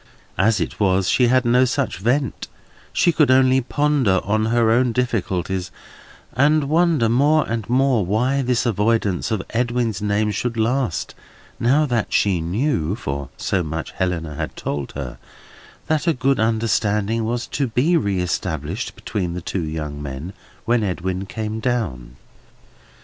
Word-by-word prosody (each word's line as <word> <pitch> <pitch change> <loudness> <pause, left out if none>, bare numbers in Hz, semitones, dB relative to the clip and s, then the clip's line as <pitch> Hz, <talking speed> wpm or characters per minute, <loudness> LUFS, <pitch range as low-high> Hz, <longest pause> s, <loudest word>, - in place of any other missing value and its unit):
As 110 +2 +3
it - - -4
was, 95 -2 +2
she 125 +5 +3
had 130 0 +3
no 125 +2 +4
such 130 -7 -1
vent: 125 +4 -1 0.4
she 175 - +3
could 150 -4 +3
only 130 0 +5
ponder 135 -7 +1
on 110 +2 0
her 115 0 +2
own 120 +1 +2
difficulties, 95 -6 -1 0.6
and 150 +4 +3
wonder 155 -3 +2
more 145 +7 +3
and 115 -2 -3
more 130 -3 +3
why 125 +9 +1
this 125 -1 0
avoidance 105 -3 +1
of 110 -5 -1
Edwin's 120 -3 -1
name 105 +1 +1
should 115 +3 -3
last, 115 -3 0 0.5
now 140 +6 +3
that 120 -6 -1
she 95 -5 +2
knew—for 85 - -2
so 95 - 0
much 80 -1 -4
Helena 85 -4 -2
had 75 +1 -5
told 70 -1 -4
her—that 70 - -6
a 165 - +4
good 135 +1 +1
understanding 110 -1 +1
was 120 +2 -2
to 140 -2 -2
be 125 +9 +1
reëstablished 90 - -2
between 90 -5 -3
the - - -3
two 95 - -3
young 75 -2 -4
men, 70 +6 -6 0.3
when 120 0 +2
Edwin 95 -1 -2
came 110 +1 -4
down. 90 - -2
110 Hz, 145 wpm, -21 LUFS, 95-125 Hz, 0.6 s, only